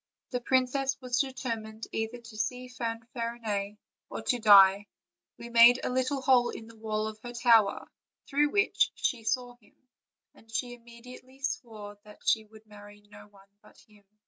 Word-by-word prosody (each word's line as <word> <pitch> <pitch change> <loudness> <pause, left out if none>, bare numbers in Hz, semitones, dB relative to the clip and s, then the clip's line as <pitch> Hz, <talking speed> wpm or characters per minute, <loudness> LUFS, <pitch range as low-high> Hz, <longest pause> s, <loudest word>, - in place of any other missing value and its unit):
The 250 -1 -2
princess 260 +2 0
was 250 -2 -2
determined 230 -5 -4
either 225 +2 -3
to 235 -2 -14
see 250 +3 -3
Fanfarinet 230 -3 -4 0.3
or - - -6
to 245 - 0
die; 200 -2 +7 0.5
we 235 - -9
made 235 +1 +7
a - - -1
little 260 +2 -1
hole 250 -2 +4
in 225 - -8
the 230 0 -15
wall 215 -1 -3
of 215 0 -8
her 240 0 -8
tower, 230 -4 +3 0.4
through 290 +1 +2
which 400 +5 +2
she 240 -4 -2
saw 245 +2 -2
him, 215 -4 -27 0.6
and 225 - -21
she 245 +2 -3
immediately 245 +2 -14
swore 210 -6 -5
that 210 0 -16
she 220 -1 +2
would 220 0 -18
marry 205 -1 -14
no 205 0 -14
one 200 -1 -22
but 210 - -21
him." 210 -1 -22
230 Hz, 165 wpm, -29 LUFS, 215-250 Hz, 0.6 s, die